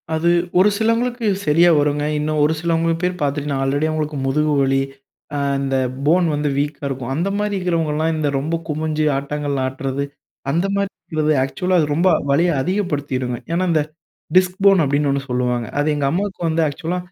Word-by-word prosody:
அது 165 +2 +1 0.3
ஒரு 195 +3 +6
சிலவங்களுக்கு 230 +1 0 0.2
சரியா 165 +3 +5
வருங்க. 145 0 +1 0.2
இன்னும் 150 0 0
ஒரு 150 +2 +3
சிலவங்க 165 0 +1
பேர் 180 0 -1
பார்த்துட்டீங்கன்னா, 145 -1 -1
ஆல்ரெடி 140 +3 0
அவுங்களுக்கு 155 -1 -2
முதுகு 150 +2 +1
வலி. 135 0 +2 0.5
அ - - -1 0.2
இந்த 135 -1 -1 0.3
போன் 175 +4 +4
வந்து 145 0 0
வீக்கா 145 +1 -2
இருக்கும். 130 -2 -4
அந்த 175 +6 0
மாரி 210 0 -1
இருக்கிறவங்கல்லாம் 165 -3 0
இந்த 155 -2 0
ரொம்ப 155 +4 -2
குமிஞ்சு 155 0 -1
ஆட்டாங்கல் 145 0 -3
ஆட்றது 135 +1 -3 0.5
அந்த 170 +6 +1
மாரி 200 0 0
இருக்கிறது. 155 -1 -2
ஆக்சுவலா, 180 +7 0
அது 155 - +2
ரொம்ப 175 +4 +3 0.2
வலிய 165 +6 +3
அதிகப்படுத்திருங்க. 145 -9 -2
ஏன்னா 170 +2 +1
இந்த 155 -2 +3 0.6
டிஸ்க் 185 0 +3
போன் 195 -3 +6
அப்படின்னு 145 +1 +1
ஒண்ணு 140 0 0
சொல்லுவாங்க. 125 -1 0
அது 145 +1 +1
எங்க 145 -1 0
அம்மாவுக்கு 190 +2 -2
வந்து 160 +1 +1
ஆக்சுவலா 165 +5 -3
155 Hz, 170 wpm, -20 LUFS, 140-175 Hz, 0.6 s, ஒரு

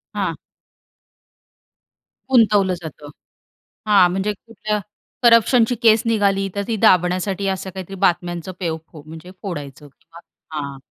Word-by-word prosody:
हां. - - -1 2.0
गुंतवलं 210 -6 +4
जातं. 150 -2 -9 0.8
हां, 195 -4 +6
म्हणजे 195 +3 -1
कुठल्या 210 0 -4 0.4
करप्शनची 235 +1 +5
केस 220 -1 +6
निघाली, 200 -3 +1
तर 200 - -1
ती 230 - -1
दाबण्यासाठी 185 +2 +2
असं 190 0 -3
काहीतरी 190 +1 -8
बातम्यांचं 175 0 -1
पेव 165 -3 -2
फो 150 -3 -12
म्हणजे 160 +3 -11
फोडायचं 145 -6 -7
किंवा 165 +4 -18 0.4
हां. 140 -2 -5
190 Hz, 115 wpm, -20 LUFS, 170-210 Hz, 2.0 s, हां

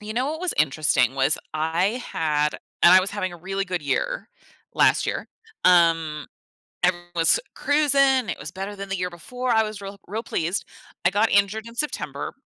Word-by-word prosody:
You 210 +1 -6
know 250 +2 0
what 315 +2 -5
was 365 -2 -1
interesting 135 -4 +2
was 135 +2 +2 0.2
I 170 +10 0
had 150 -2 +1 0.3
and 175 - +8
I 185 - +8
was 190 +1 -2
having 185 -2 -3
a - - -9
really 195 +3 -3
good 180 -1 -3
year - - -2 0.5
last - - +3
year. - - -3 0.4
Um, 165 -4 +3 0.6
and 180 0 +4
it 175 0 -17
was 165 - +4 0.2
cruising, 275 -4 +3
it - - -5
was 150 - -7
better 195 +4 -6
than 200 0 -7
the 195 - -2
year 180 0 -2
before. 250 +9 -5
I 220 -2 +4
was 215 -1 -5
real 200 0 -8
real 215 +4 -3
pleased. 175 -3 -2 0.4
I 175 - +5
got 210 +3 +2
injured 200 +2 +2
in 230 - -10
September, 300 +5 -3
190 Hz, 195 wpm, -24 LUFS, 165-220 Hz, 0.6 s, and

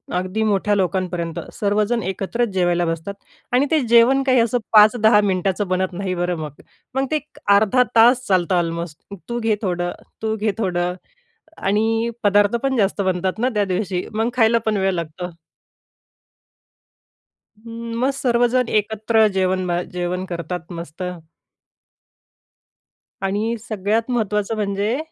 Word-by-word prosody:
अगदी 185 +4 -1
मोठ्या 210 -1 +1
लोकांपर्यंत. 180 -3 -1
सर्वजण 210 +3 0
एकत्रच 195 +6 -2
जेवायला 175 -2 +1
बसतात. 165 +4 -3 0.4
आणि 255 +3 +4
ते 315 - +4
जेवण 235 +4 +5
काही 260 -2 +3
असं 235 +1 +2 0.2
5-10 215 0 +6
मिनिटाचं 195 0 0
बनत 185 0 -1
नाही 185 +1 -3
बरं 175 0 -1
मग. 150 -2 -8 0.3
मग 270 0 +1
ते 310 - +2 0.4
अर्धा 215 +5 +4
तास 240 +3 +5
चालतं 185 -1 +2
ऑलमोस्ट. 170 -2 -2 0.3
तू 240 0 -2
घे 225 -2 +1
थोडं, 175 -3 -1 0.3
तू 220 0 -1
घे 215 0 0
थोडं 180 -3 -1 0.6
आणि 225 +3 +1
पदार्थ 205 +1 +3
पण 270 -1 +1
जास्त 200 -1 +1
बनतात 185 +1 -1
ना 250 +3 +2
त्या 205 -1 +2
दिवशी. 185 -1 -2
मग 225 +2 0
खायला 230 -1 +4
पण 215 -1 +1
वेळ 190 0 +1
लागतो. 170 +1 -5 2.3
मग 230 +2 -2
सर्वजण 245 -2 +1
एकत्र 220 +1 +2
जेवण 185 -1 0
बा 175 0 0
जेवण 180 +1 -2
करतात, 175 0 -5
मस्त. 170 0 -8 2.2
आणि 205 +4 -1
सगळ्यात 215 +3 -1
महत्त्वाचं 215 -2 0
म्हणजे 205 +3 -1
205 Hz, 130 wpm, -21 LUFS, 180-225 Hz, 2.3 s, 5-10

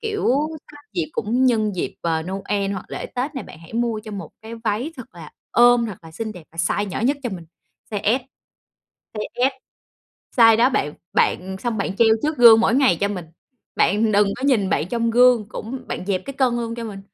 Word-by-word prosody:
kiểu, 435 -2 -1 0.6
dịp 170 -5 -1
cũng 245 +5 +1
nhân 215 -5 +1
dịp, - - -3
ờ, 160 -1 -1
Noel 195 +2 -2
hoặc 190 - -5
lễ - - -5
Tết 265 +5 -4
này, 265 - -5
bạn - - -13
hãy 165 0 -15
mua 230 -1 -1
cho 215 - -8
một 200 - -7
cái 225 +1 -8
váy 230 +9 -1
thật 255 - -11
là 165 -3 -11 0.2
ôm, 240 -1 +5
thật 200 -5 -7
là 165 - -12
xinh 220 +6 -5
đẹp 180 -5 -12
và 165 - -18
size 180 +4 0
nhỏ 185 - -4
nhất 265 +6 +2
cho 245 - -3
mình, 180 -3 -7 0.5
size 215 +4 +1
S. - - -18 1.0
Size 245 +4 0
S, - - -16 0.9
size 225 -1 +8
đó 240 +3 +5
bạn 150 - -1 0.2
bạn 190 +1 +1
xong 235 +1 -2
bạn 195 -1 -2
treo 230 +1 +5
trước 305 0 -1
gương 230 -2 +8
mỗi 230 - +2
ngày 265 -10 +4
cho 200 - +2
mình. 185 -4 -5 0.5
Bạn 215 +2 +2
đừng 205 0 +4
có 255 - -8
nhìn 225 -9 +2
bạn 160 - 0
trong 230 0 0
gương 240 -2 +4
cũng 245 +5 -6
bạn 185 - -5
dẹp 190 -2 -1
cái 275 - -6
cân 255 -3 +1
luôn 230 -1 -3
cho 235 - -6
mình. 205 -3 -7
220 Hz, 220 wpm, -22 LUFS, 195-245 Hz, 1.0 s, size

